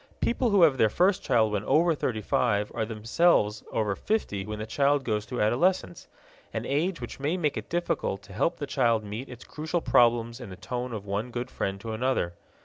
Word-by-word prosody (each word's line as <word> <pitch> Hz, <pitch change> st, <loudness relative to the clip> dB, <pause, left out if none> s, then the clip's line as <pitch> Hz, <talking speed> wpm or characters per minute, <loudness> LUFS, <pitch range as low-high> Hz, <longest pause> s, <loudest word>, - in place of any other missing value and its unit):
People 240 Hz, +1 st, +1 dB
who 200 Hz, -4 st, +5 dB
have 140 Hz, -6 st, +4 dB
their 110 Hz, -, +5 dB
first 185 Hz, -, +2 dB
child 110 Hz, -4 st, +2 dB
when 105 Hz, -1 st, -1 dB
over 170 Hz, +2 st, +4 dB
thirty 115 Hz, -7 st, -2 dB
five 105 Hz, -2 st, +1 dB
are 110 Hz, -2 st, -1 dB
themselves 110 Hz, 0 st, +2 dB
over 105 Hz, -3 st, 0 dB
fifty 105 Hz, -, -2 dB
when 105 Hz, 0 st, -4 dB
the 105 Hz, -, -4 dB
child 140 Hz, +4 st, +2 dB
goes 105 Hz, -4 st, -1 dB
through 125 Hz, -, -3 dB
adolescence 120 Hz, -, +1 dB, 0.5 s
an -, -, -2 dB
age 165 Hz, +6 st, 0 dB
which -, -, -7 dB
may 150 Hz, +6 st, 0 dB
make 150 Hz, -5 st, 0 dB
it -, -, -6 dB
difficult 170 Hz, -, -1 dB
to 95 Hz, -, -13 dB
help 170 Hz, -, 0 dB
the 145 Hz, -, -4 dB
child 115 Hz, -5 st, +1 dB
meet 105 Hz, +6 st, -6 dB
its 125 Hz, -1 st, -10 dB
crucial 160 Hz, +3 st, -3 dB
problems 120 Hz, -3 st, +3 dB
in 120 Hz, -5 st, -8 dB
the 95 Hz, -, -8 dB
tone 120 Hz, +7 st, -4 dB
of 105 Hz, -3 st, -6 dB
one 105 Hz, +4 st, -2 dB
good 120 Hz, +1 st, -5 dB
friend 95 Hz, 0 st, -3 dB
to 115 Hz, +1 st, -5 dB
another. 115 Hz, -7 st, 0 dB
120 Hz, 210 wpm, -27 LUFS, 105-150 Hz, 0.5 s, who